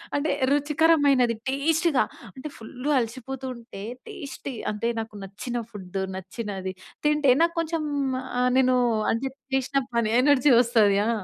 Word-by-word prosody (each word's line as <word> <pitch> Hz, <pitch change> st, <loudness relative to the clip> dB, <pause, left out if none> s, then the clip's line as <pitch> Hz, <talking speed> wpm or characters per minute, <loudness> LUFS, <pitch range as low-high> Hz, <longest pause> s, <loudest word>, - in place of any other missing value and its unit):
అంటే 290 Hz, +2 st, +1 dB, 0.2 s
రుచికరమైనది 290 Hz, -4 st, +3 dB
టేస్ట్‌గా 310 Hz, +1 st, +2 dB, 0.3 s
అంటే 260 Hz, +3 st, -7 dB
ఫుల్ 250 Hz, +5 st, -8 dB
అలసిపోతూ 260 Hz, +2 st, -3 dB
ఉంటే 230 Hz, -4 st, -10 dB, 0.3 s
టేస్టీ 275 Hz, -1 st, -7 dB, 0.2 s
అంటే 210 Hz, +2 st, -2 dB
నాకు 220 Hz, -1 st, -6 dB
నచ్చిన 205 Hz, +5 st, -5 dB
ఫుడ్డు 190 Hz, -2 st, -5 dB
నచ్చినది 190 Hz, 0 st, -5 dB, 0.3 s
తింటే 300 Hz, -3 st, +4 dB
నాకు 335 Hz, 0 st, +3 dB
కొంచెం 330 Hz, -1 st, -1 dB, 0.5 s
ఆహ్, 250 Hz, 0 st, +3 dB
నేను 255 Hz, -1 st, +4 dB, 0.4 s
అంటే 245 Hz, +4 st, -1 dB, 0.3 s
చేసిన 270 Hz, +1 st, 0 dB, 0.2 s
పని 230 Hz, -2 st, +2 dB
ఎనర్జీ 285 Hz, 0 st, +4 dB
వస్తది, 225 Hz, -5 st, +4 dB
ఆ! -, -, +1 dB
255 Hz, 130 wpm, -25 LUFS, 225-285 Hz, 0.5 s, తింటే